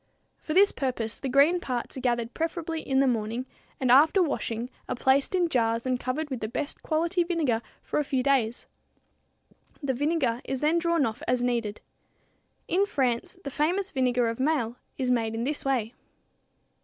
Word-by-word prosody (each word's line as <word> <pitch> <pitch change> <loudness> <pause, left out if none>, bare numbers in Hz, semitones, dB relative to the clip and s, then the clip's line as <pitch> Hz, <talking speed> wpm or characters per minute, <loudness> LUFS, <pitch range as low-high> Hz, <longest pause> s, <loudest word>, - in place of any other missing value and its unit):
For 310 - -4
this 400 +2 +6
purpose, 240 -5 -2
the 270 - -3
green 285 +7 +5
parts 250 -7 -4
are - - -5
gathered 240 -2 -1
preferably 325 0 -3
in 265 0 +1
the 275 - +3
morning 230 +1 -1 0.3
and 255 -2 +2
after 315 +8 +6
washing 245 -5 -2 0.2
are - - -1
placed 270 +7 +2
in 355 -2 +3
jars 230 -5 +1
and 255 -1 0
covered 285 +5 -3
with 260 - -2
the 215 - -3
best 285 +6 -4
quality 335 +3 +1
vinegar 315 -10 0 0.2
for - - -1
a - - +1
few 265 -2 -1
days. 255 -4 +1 1.2
The 270 -1 0
vinegar 270 -3 0
is 265 - -3
then 310 +4 +2
drawn 335 -3 +2
off 220 -1 -4
as 250 0 +1
needed. 235 -4 -1 0.9
In 390 +3 +2
France, 250 - -1
the 280 - -5
famous 360 +8 0
vinegar 250 -2 +1
of 230 +1 -3
Maille 260 -5 +1 0.2
is 255 -2 0
made 225 -2 0
in 230 - -2
this 290 +3 -2
way. 250 -4 0
265 Hz, 180 wpm, -27 LUFS, 240-310 Hz, 1.2 s, this